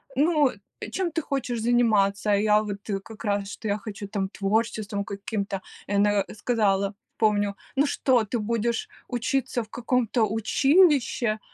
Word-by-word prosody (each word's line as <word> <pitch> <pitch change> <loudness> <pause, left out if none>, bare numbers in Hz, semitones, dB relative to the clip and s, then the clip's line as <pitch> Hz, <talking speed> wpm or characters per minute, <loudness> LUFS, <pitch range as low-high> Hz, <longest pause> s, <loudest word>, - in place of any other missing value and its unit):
"Ну, 300 -1 +4 0.3
э, - - -6
чем 370 -3 -1
ты 325 +1 -1
хочешь 255 -5 -2
заниматься?" 215 -4 +2
А - - +5
я, 210 +1 +4
вот, 205 0 -7
э, 195 -1 0
как 220 +3 -11
раз, 200 -1 0
что 220 - -6
я 205 +1 +1
хочу, 205 -1 -7
там, 195 -2 -2
творчеством 205 0 -1
каким-то. 200 -1 -4 0.3
И 200 - -3
она, 205 0 +3
э, - - -9
сказала, 200 -3 +1 0.2
помню: 205 -2 +2 0.2
"Ну 280 +2 +4
что, 255 -5 +2
ты 230 +3 -2
будешь 235 - -1 0.2
учиться 245 0 -1
в 215 - -17
каком-то 240 -1 +1
училище, 245 - +3
215 Hz, 160 wpm, -26 LUFS, 200-245 Hz, 0.3 s, А